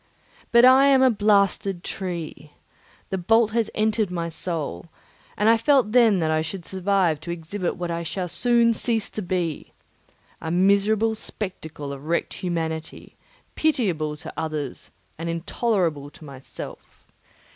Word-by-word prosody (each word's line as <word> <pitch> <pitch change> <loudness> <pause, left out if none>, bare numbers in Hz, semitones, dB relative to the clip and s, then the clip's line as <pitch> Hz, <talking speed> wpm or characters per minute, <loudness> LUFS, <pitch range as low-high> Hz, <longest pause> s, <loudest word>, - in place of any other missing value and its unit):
But 235 +1 +7
I 265 +2 +7
am 270 -1 +5
a 260 - +5
blasted 200 -3 +1
tree; 165 -5 -6 0.6
the 190 - -1
bolt 225 +4 +3
has 230 0 0
entered 215 -1 +1
my 170 -2 -3
soul; 165 -1 -4 0.5
and 210 - +2
I 225 0 +6
felt 260 -2 +3
then 230 -4 +5
that 160 -1 +1
I 155 0 +2
should 170 +2 -6
survive 190 -4 +1
to 160 - -9
exhibit 170 +2 -3
what 175 -1 -4
I 170 0 -2
shall 180 +2 -4
soon 235 +6 +3
cease 225 -1 0
to 215 - -4
be—a 170 -2 -6
miserable 200 +5 +3
spectacle 160 -9 -6
of 140 +1 -10
wrecked 170 +2 -1
humanity, 160 -3 -4 0.4
pitiable 180 - 0
to 150 - -9
others 155 -4 -4 0.3
and 165 +1 -3
intolerable 170 - -1
to 155 - -15
myself. 135 -2 -11
185 Hz, 140 wpm, -24 LUFS, 160-220 Hz, 0.6 s, But